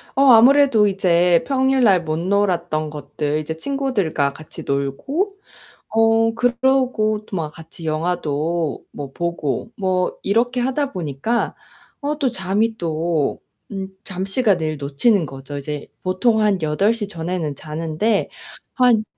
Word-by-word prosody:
어 275 - +4
아무래도 255 -2 +6
이제 175 -3 +3
평일날 260 -9 +3
못 155 0 -2
놀았던 170 -4 0
것들 150 0 -3
이제 155 +1 -4
친구들과 200 - -1
같이 155 - -10
놀고 270 - -1 0.5
어 225 0 +3
그러고 245 -3 +1
또 195 - -5
막 160 -3 -2
같이 165 +1 -11
영화도 160 -1 -1
뭐 140 -2 -7
보고 170 +3 -3
뭐 185 -3 0
이렇게 240 +5 +1
하다 265 +3 0
보니까 180 - -2 0.5
어 295 0 -2
또 280 -3 +2
잠이 215 +1 0
또 165 -4 -1 0.3
음 195 -1 -4 0.2
잠시간 195 +2 0
늘 155 -2 -2
놓치는 150 - +1
거죠. 135 +1 -7
이제 145 +1 -5 0.2
보통 220 +5 +2
한 205 -4 +2
8:00 200 +8 +1
전에는 165 -4 -3
자는데 160 +8 -1 0.5
한 245 -4 +4
185 Hz, 240 characters per minute, -21 LUFS, 155-230 Hz, 0.5 s, 아무래도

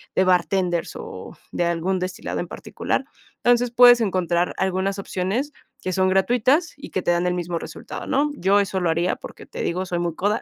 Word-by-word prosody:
de 190 - +4
bartenders, 180 -1 +1
o, - - -8 0.2
de 175 - 0
algún 170 +2 0
destilado 185 0 -4
en - - -5
particular. - - -3 0.4
Entonces, 245 0 +3
puedes 245 0 +7
encontrar 180 -4 +1
algunas 190 +1 0
opciones 195 +10 -2 0.3
que 185 - -2
son 185 +1 +2
gratuitas, 245 - +2
y 285 - -9
que 185 - -1
te 175 - +1
dan 175 +1 +1
el 180 - +1
mismo 175 -1 -2
resultado, - - -8
¿no? 290 +2 +1
Yo 200 -3 +3
eso 195 -1 0
lo 175 -2 +1
haría, 170 +2 +1
porque - - -11
te - - -6
digo, 185 +2 -1
soy 175 -1 -2
muy 170 -2 -2
coda, 205 +5 0
185 Hz, 195 wpm, -23 LUFS, 175-215 Hz, 0.4 s, puedes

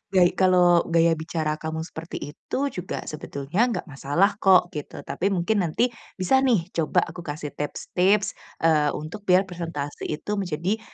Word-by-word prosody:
gay 175 -1 +6
kalau 180 -2 +4
gaya 165 0 +4
bicara 160 -1 -2
kamu 160 0 -4
seperti 160 -3 -7
itu - - -6
juga 180 0 -5
sebetulnya 155 - -1
nggak 205 -7 -2
masalah 160 +7 0
kok 185 -2 +5
gitu, 150 -1 -7
tapi 190 - -2
mungkin 200 +2 +1
nanti 185 +8 +1 0.2
bisa 195 +8 +3
nih 220 -10 +1
coba 160 -2 +1
aku 165 +2 -8
kasih 150 -3 -5
tips-tips, 190 +7 0 0.3
eee, 155 -3 +3
untuk 190 +7 -7
biar 185 +1 +5
presentasi 165 -6 -5
itu 155 +7 -4
menjadi 185 +4 -1
170 Hz, 155 wpm, -25 LUFS, 155-190 Hz, 0.3 s, gay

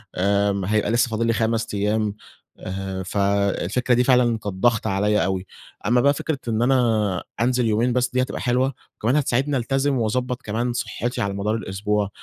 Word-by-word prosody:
آمم 100 +1 +1
هيبقى 105 +1 +1
لسّه 120 0 +2
فاضل 115 +1 -1
لّي 115 - +2
5 115 0 0
أيّام، 105 +1 0 0.4
آآ 95 0 -5
فالفكرة 100 +4 0
دي 125 +1 +4
فعلًا 125 -1 +4
كانت 110 - -9
ضغط 115 +3 +2
عليَّ 105 -1 +2
أوي، 95 0 -2 0.4
أما 120 +3 +3
بقى 140 +2 +4
فكرة 145 0 -3
إن 110 -1 0
أنا 115 -7 +2 0.2
أنزل 125 0 +2
يومين 115 +3 +1
بس 125 0 +1
دي 130 - +1
هتبقى 130 - -3
حلوة، 130 +2 +1 0.2
وكمان 120 +5 0
هتساعدني 140 0 +1
ألتزم 135 +3 0
واضبط 125 +2 -1
كمان 120 +3 -2
صحّتي 120 0 -3
على 100 -1 -1
مدار 100 +2 -1
الأسبوع، 105 -1 -1
115 Hz, 170 wpm, -23 LUFS, 100-125 Hz, 0.4 s, دي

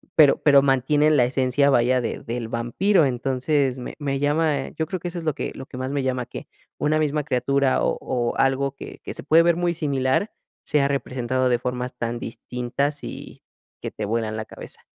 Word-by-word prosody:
pero 150 -3 +6
pero 140 -2 +7
mantienen 145 +3 +3
la 120 - +5
esencia, 130 +2 +2
vaya, 125 0 +3
de 120 - -3
del 115 0 -4
vampiro, 145 - +2
entonces 130 +1 0
me 125 - -7
me 140 -2 -2
llama 145 -1 +1
yo 160 - -1
creo 185 +3 -4
que 175 - -5
eso 175 0 -6
es 170 - -5
lo 155 -2 0
que 145 - -4
lo 135 - -8
que 130 - -10
más 130 +1 -3
me 140 -1 -1
llama, 125 -2 -1
que - - -8 0.3
una 155 +1 +1
misma 150 -1 0
criatura, 135 0 +1
o - - +1
o 120 -2 -2
algo 135 +1 +1
que - - -10
que - - -6
se - - -7
puede 160 +2 +5
ver 170 0 +3
muy 175 0 0
similar 140 +3 0 0.3
sea 140 -2 +2
representado 130 -2 -1
de 120 - +3
formas 125 0 -4
tan 120 0 -3
distintas, 125 +5 -3
y - - -8 0.4
que - - -4
te 105 - -4
vuelan 110 0 -2
la 110 - -4
cabeza. - - -11
135 Hz, 205 wpm, -23 LUFS, 125-150 Hz, 0.4 s, pero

